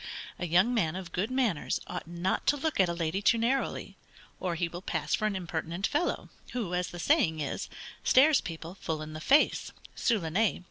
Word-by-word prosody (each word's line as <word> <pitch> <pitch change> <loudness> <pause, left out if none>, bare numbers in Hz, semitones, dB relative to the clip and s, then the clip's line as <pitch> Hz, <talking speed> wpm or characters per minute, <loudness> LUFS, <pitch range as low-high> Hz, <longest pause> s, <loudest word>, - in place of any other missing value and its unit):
A 180 - -2
young 185 +9 +4
man 175 -8 +1
of 185 -2 -6
good 190 +4 -1
manners 245 - 0
ought 180 -2 -6
not 175 +2 -1
to 290 - +4
look 310 -2 -1
at 185 -2 +5
a - - 0
lady 170 +3 -1
too 210 +3 +4
narrowly, 250 +4 -1 0.4
or 180 -2 -1
he 175 +1 0
will 175 +1 -7
pass - - -2
for 215 - +2
an 210 - -2
impertinent 170 +1 -3
fellow, 300 +8 0 0.2
who, 220 -8 -2
as 180 0 0
the 175 - -8
saying 175 - +2
is, 145 - -3 0.3
stares 285 +3 +6
people 165 0 -7
full 160 -5 -4
in 155 0 -8
the 155 - -6
face, 285 - +3 0.2
(sous 230 -3 +2
le 165 -3 -4
nez.) 210 +4 +2
185 Hz, 205 wpm, -30 LUFS, 170-230 Hz, 0.4 s, stares